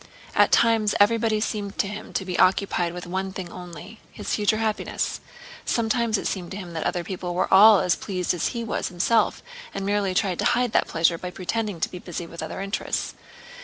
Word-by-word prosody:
At - - +4
times 225 -3 +3
everybody 220 +1 +3
seemed 205 -2 -3
to - - +1
him 210 +1 -7
to 190 - -1
be 180 -1 -3
occupied 185 -2 +2
with 175 +1 -7
one 190 +2 -3
thing 185 -2 -6
only—his 180 +4 -8
future 210 0 +2
happiness. 220 -1 -2 0.4
Sometimes 230 -1 +1
it - - -5
seemed 180 -3 -3
to 190 - -6
him 180 -4 -8
that 160 - -3
other 175 - -2
people 180 0 -5
were 180 - +1
all 205 +1 +8
as 180 -1 +2
pleased 180 -3 -2
as 175 - -1
he 235 -2 -3
was 225 - -2
himself 200 +6 +1 0.3
and 195 - -3
merely 200 -2 0
tried 185 -3 0
to - - 0
hide 245 -1 +2
that - - +2
pleasure 165 0 +2
by 180 - -5
pretending 195 +1 -3
to - - +2
be 180 - -7
busy 175 -1 -6
with 170 0 -8
other - - -5
interests. 195 +1 -2
195 Hz, 200 wpm, -24 LUFS, 180-215 Hz, 0.4 s, all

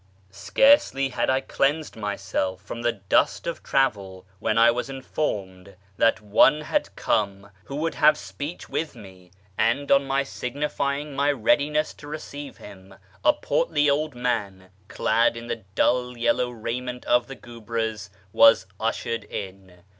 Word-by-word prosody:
Scarcely 135 - +3
had 125 - -1
I 130 0 +2
cleansed 145 +3 -1
myself 95 -3 -3
from 115 +3 -7
the 120 0 +2
dust 100 -3 +1
of 170 -1 -4
travel, 100 -9 -1
when 110 0 0
I 115 +1 +6
was 125 +3 -3
informed 100 -9 -4 0.2
that 115 - +3
one 105 +8 +4
had 290 - -2
come 100 -1 -1
who 140 - -7
would 160 +3 -1
have 150 0 +5
speech 100 - -7
with 155 -4 -3
me; 95 -5 -14 0.3
and 120 +6 +1
on 140 0 +5
my 135 +1 +1
signifying 140 +2 -3
my 145 +1 +2
readiness 150 +4 +1
to 145 - -13
receive 145 -1 -8
him, 95 -1 -13 0.3
a - - +6
portly 295 - +1
old 150 -1 -1
man, 100 -7 -3 0.2
clad 115 +3 +1
in 115 - -7
the 115 -3 -5
dull 125 0 +1
yellow 125 +1 +1
raiment 125 +2 -5
of 120 0 +2
the 135 - -8
guebres, 115 -3 -5 0.2
was 115 -5 +6
ushered 115 +1 -2
in. 95 -2 -8
120 Hz, 145 wpm, -24 LUFS, 100-140 Hz, 0.3 s, I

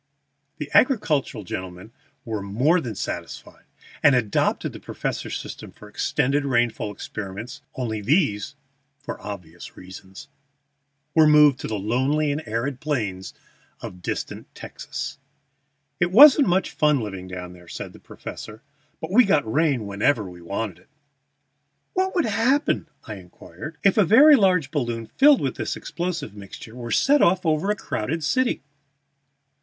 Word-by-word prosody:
The 150 - -5
Agricultural 160 - +2
gentlemen 90 +3 -7 0.3
were 110 -3 -3
more 125 - +2
than 115 -6 -5
satisfied, - - -7 0.4
and 145 -3 +6
adopted 110 -5 0
the - - -9
professor's - - -4
system - - -9
for - - -15
extended 140 +3 0
rainfall 120 -5 0
experiments 105 +5 -7
only 110 -4 -3
these 135 - +1 0.4
(for 145 - -8
obvious 90 -5 -9
reasons) 95 +1 -11 0.9
were 160 -1 +6
removed 150 -3 +6
to - - -5
the 110 - -3
lonely 130 +9 0
and 145 +2 -2
arid 120 +4 -2
plains 105 -12 -3 0.4
of 90 0 -9
distant - - -5
Texas. - - -7 0.8
"It 175 - +2
wasn't 280 +5 +8
much 185 +1 +1
fun 150 -2 +2
living 95 -5 -6
down 90 -1 -7
there," 90 -1 -16
said - - -7
the - - -14
professor; 110 +4 -10 0.4
"but 160 - -6
we 245 +6 +7
got 155 - +2
rain 140 -1 +1
whenever 105 +3 0
we 90 -1 -12
wanted 100 +2 -4
it." - - -26 1.0
"What 375 +1 0
would 350 - +2
happen," 230 - +1 0.2
I 105 -3 -7
inquired, 95 - -11
"if 200 +2 +4
a - - +7
very 280 - +7
large 180 - +2
balloon 120 -6 -2
filled 275 - +4
with 135 -2 -2
this - - -3
explosive 175 - -4
mixture 105 +2 -11
were 120 -1 -7
set 285 - +3
off 185 +1 +3
over 160 +4 +1
a 210 - +2
crowded 155 - -3
city?" 255 - 0
130 Hz, 145 wpm, -23 LUFS, 105-165 Hz, 1.0 s, wasn't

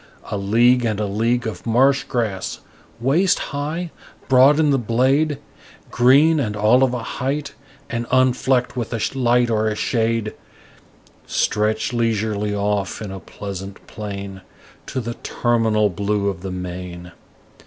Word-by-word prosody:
A - - -1
league 120 +5 +3
and 110 -3 -1
a 105 - 0
league 115 +5 0
of 110 - -5
marsh 135 +4 +3
grass, 110 -6 -3 0.4
waist 155 +10 +2 0.2
high, 155 +4 -3 0.4
broad 135 +3 +6
in 150 -2 +3
the 135 - +2
blade, 130 +6 +1 0.5
Green, 140 +6 +5
and 105 -6 -2
all 110 +5 +4
of 130 -2 +3
a 120 - -4
height, 140 +5 -3 0.3
and 120 -3 -4
unflecked 130 0 +2
with 120 -3 -3
a 115 +4 -2
light 120 -2 +2
or 110 0 +1
a 105 - -1
shade, 115 -1 0 0.9
Stretch 110 +3 0
leisurely 110 -3 0
off, 100 -2 -1
in 105 -3 -6
a 95 - -6
pleasant 95 +2 -8
plain, 100 -2 -7 0.5
To 130 - -3
the 120 0 -4
terminal 115 -3 +1
blue 100 +2 -1
of 95 -3 -6
the 95 - -5
main. 90 -1 -7
115 Hz, 145 wpm, -21 LUFS, 105-130 Hz, 0.9 s, broad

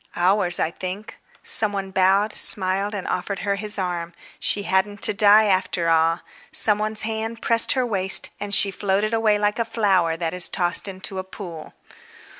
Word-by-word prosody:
"Ours, 180 0 +2
I 160 - -1
think—" 190 +5 -8 0.2
Some 215 -2 0
one 195 -1 -5
bowed, 195 +3 +1
smiled, 195 +2 +1
and 195 - -6
offered 195 +2 -3
her 200 - 0
his 210 +2 -2
arm; 175 -2 -4 0.3
she 205 - 0
hadn't 200 +2 -1
to - - +5
die 205 +1 +5
after 185 -3 0
all. 165 +1 +1 0.3
Some 210 -1 +3
one's 215 0 -3
hand 225 +1 -5
pressed 230 -1 +4
her 260 -2 -1
waist, 195 -4 +2
and 205 0 -6
she 200 0 +5
floated 200 +3 -1
away 220 -2 +2
like 205 +2 -1
a - - +2
flower 195 -8 0
that 165 0 -3
is 180 -1 +5
tossed 175 +2 -1
into 190 0 -6
a - - -5
pool. 175 -4 -11
195 Hz, 180 wpm, -21 LUFS, 185-210 Hz, 0.3 s, to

